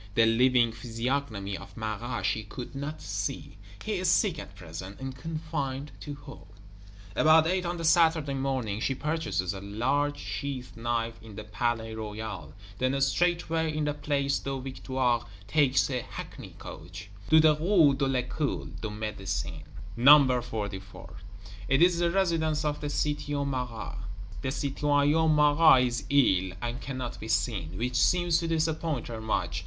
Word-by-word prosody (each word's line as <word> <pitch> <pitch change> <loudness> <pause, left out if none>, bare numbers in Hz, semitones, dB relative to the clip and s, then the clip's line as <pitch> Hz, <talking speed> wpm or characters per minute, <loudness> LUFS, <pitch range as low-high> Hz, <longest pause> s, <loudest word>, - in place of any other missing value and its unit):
The 115 - +6
living 120 +1 +4
physiognomy 115 -3 -3
of 95 -1 -11
Marat 110 +2 -3
she 110 - +1
could 120 +5 -8
not 145 +3 -5
see; 100 -1 -4 0.3
he 215 -2 -1
is 185 -1 +1
sick 180 -4 +3
at 100 - -10
present, 90 +2 -8
and 135 0 -5
confined 145 -2 -4
to 145 - -6
home. 145 -1 -12 0.7
About 155 0 +6
eight 180 +1 0
on 175 0 -2
the 165 - -5
Saturday 160 -3 +4
morning, 130 -6 -1
she 135 +3 0
purchases 150 - -1
a 95 - -7
large 140 +9 0
sheath 130 -3 -5
knife 115 0 -2
in 110 -2 -12
the 110 - -6
Palais 115 +1 -2
Royal; 105 -7 -6 0.2
then 130 +2 +1
straightway, 160 +2 +1
in 155 - 0
the 150 0 0
Place 140 -1 0
des 135 -1 -4
Victoires, 130 -2 -1 0.3
takes 140 +1 +3
a 125 -1 -1
hackney - - -9
coach: 90 +6 -10 0.2
"To 160 - +7
the 155 -1 +6
Rue 160 -2 +4
de 135 0 0
l'École 125 - -2
de 110 - -3
Médecine, 105 -2 -4 0.3
No. 130 0 +7
44." 100 -5 -6 0.5
It 135 +5 +4
is 175 -1 +4
the 175 0 +2
residence 165 -4 +1
of 150 0 -1
the 145 - -3
Citoyen 145 -1 -1
Marat! 125 -3 -4 0.4
The 130 - -2
Citoyen 145 +3 +2
Marat 150 -2 +6
is 120 -1 -2
ill, 95 -10 +3
and 120 +3 -4
cannot 130 -3 -5
be 110 - -7
seen; 95 -7 -1
which 125 +3 -1
seems 175 +5 +3
to 165 - -2
disappoint 160 -4 -1
her 115 -2 -6
much. 110 - -1
135 Hz, 155 wpm, -28 LUFS, 110-150 Hz, 0.7 s, To